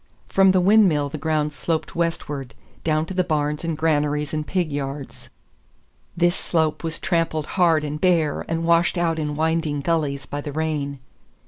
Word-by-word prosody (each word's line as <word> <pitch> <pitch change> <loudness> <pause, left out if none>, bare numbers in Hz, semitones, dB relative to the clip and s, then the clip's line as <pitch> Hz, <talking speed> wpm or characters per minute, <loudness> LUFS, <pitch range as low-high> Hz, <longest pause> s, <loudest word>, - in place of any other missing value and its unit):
From 195 0 +5
the 185 -1 +4
windmill 180 -7 +4
the 155 - -6
ground 150 -1 0
sloped 155 +4 -3
westward, 145 -7 -3 0.3
down 155 -1 +1
to 190 - -6
the 185 0 +2
barns 150 -3 -1
and 165 -2 -2
granaries 150 -2 0
and 155 -1 -2
pig 180 -5 -1
yards. 140 -1 -5 0.9
This 175 +1 +3
slope 160 -2 0
was 165 0 -2
trampled 165 -3 0
hard 165 -5 +3
and 150 0 -4
bare, 165 -5 +2
and 165 0 -1
washed 170 +2 +3
out 165 -2 +1
in 150 -1 -2
winding 160 -2 0
gullies 140 -3 -1
by 145 +2 -5
the 145 - -6
rain. 150 -2 -2
155 Hz, 165 wpm, -23 LUFS, 150-170 Hz, 0.9 s, From